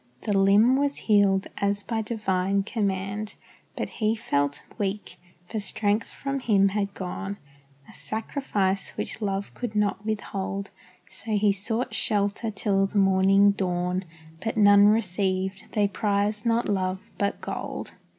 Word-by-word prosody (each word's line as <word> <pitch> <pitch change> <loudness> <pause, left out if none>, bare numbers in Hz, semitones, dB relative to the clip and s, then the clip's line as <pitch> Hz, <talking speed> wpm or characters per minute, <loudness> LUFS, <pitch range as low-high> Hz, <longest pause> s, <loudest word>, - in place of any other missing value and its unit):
The 205 - 0
limb 205 +6 +5
was 285 0 +1
healed 200 -3 +3
as 200 0 0
by 225 -2 -2
divine 195 -3 0
command, 205 -1 -2 0.4
But - - -2
He 220 0 0
felt 145 -8 -1 0.2
weak, 205 0 -3 0.3
for 220 - -4
strength 205 +2 0
from 275 0 -3
Him 200 -6 +3
had 200 0 -2
gone, 195 +2 -5 0.5
A - - -14
sacrifice 210 -4 -2
which - - -4
love 200 -1 -2
could 240 -3 -5
not 205 -1 +1
withhold; 200 -2 -3 0.4
So 220 +1 -4
he 205 0 +3
sought 220 +5 -2
shelter 205 +1 0
till 200 -2 +1
the 205 - -4
morning 195 +1 +5
dawn, 180 -1 -1 0.4
But 225 0 -2
none 205 -1 +7
received 190 -2 0
they 205 -1 +3
prized 210 +2 0
not 230 +1 +2
love, 190 -1 -1 0.2
but 200 0 0
gold. - - -5
200 Hz, 140 wpm, -26 LUFS, 195-215 Hz, 0.5 s, none